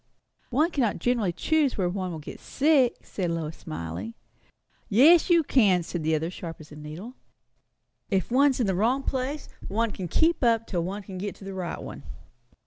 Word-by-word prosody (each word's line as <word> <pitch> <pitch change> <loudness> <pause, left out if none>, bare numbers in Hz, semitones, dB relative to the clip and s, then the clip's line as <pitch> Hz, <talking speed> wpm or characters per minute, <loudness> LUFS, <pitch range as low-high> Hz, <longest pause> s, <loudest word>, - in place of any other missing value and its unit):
"One 305 +8 +2
cannot 250 -9 0
generally 235 -7 +1
choose 300 - +1
where 185 -3 +1
one 185 +1 -2
will 165 - -5
be 150 - -8
sick," 280 -4 +2
said 180 -4 -3
Lois, 165 -2 -3
smiling. 85 +7 -6 0.7
"Yes, 310 - +6
you 340 -2 +5
can," 200 - +3
said 175 +1 -4
the 160 +1 +1
other, 155 +1 -1
as 175 - -5
sharp 165 -2 -7
as 155 -1 -13
a - - -10
needle. 155 +10 -8 1.0
"If 195 +1 0
one's 270 +1 +4
in 240 - +2
the 190 - +1
wrong 235 +9 +1
place, 270 +3 -3 0.2
one 225 +2 0
can 185 -3 -5
keep 320 - +2
up 230 -1 +3
till 175 -6 -2
one 200 +4 -4
can 190 -2 -8
get 200 +1 -4
to - - -14
the 195 - -6
right 180 -3 -4
one. - - -8
200 Hz, 195 wpm, -26 LUFS, 170-260 Hz, 1.0 s, Yes